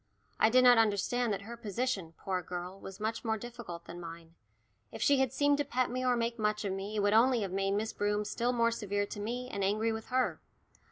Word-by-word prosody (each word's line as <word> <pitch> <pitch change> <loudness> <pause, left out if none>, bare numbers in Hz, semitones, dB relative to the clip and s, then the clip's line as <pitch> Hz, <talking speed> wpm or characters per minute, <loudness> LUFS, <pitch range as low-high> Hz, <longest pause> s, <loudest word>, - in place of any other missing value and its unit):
I 220 - +6
did 255 +2 +5
not 245 -2 +8
understand 225 +2 +1
that 200 0 -2
her 235 +3 -7
position, 210 -6 -3
poor 185 -2 -2
girl, 180 +2 -6
was 195 +1 -9
much 220 +2 -2
more 220 -1 0
difficult 230 -7 -8
than 170 +1 -8
mine. 165 -1 -9 0.6
If - - -8
she 280 -1 +4
had 265 -3 +2
seemed 285 0 +2
to - - +3
pet 255 -3 0
me 255 +1 -2
or 250 -1 +3
make 235 0 -1
much 210 0 0
of 195 - -1
me 195 +2 -5
it 210 - +1
would 205 0 +3
only 240 +1 +5
have 195 -3 -3
made 195 +1 0
Miss 215 +2 -1
Broom 210 0 0
still 240 +3 0
more 235 -1 +2
severe 205 -3 -1
to 205 - -7
me, 240 +4 -3
and 200 - -2
angry 215 +3 +1
with 220 0 -5
her. 255 0 0
220 Hz, 235 wpm, -32 LUFS, 195-245 Hz, 0.6 s, not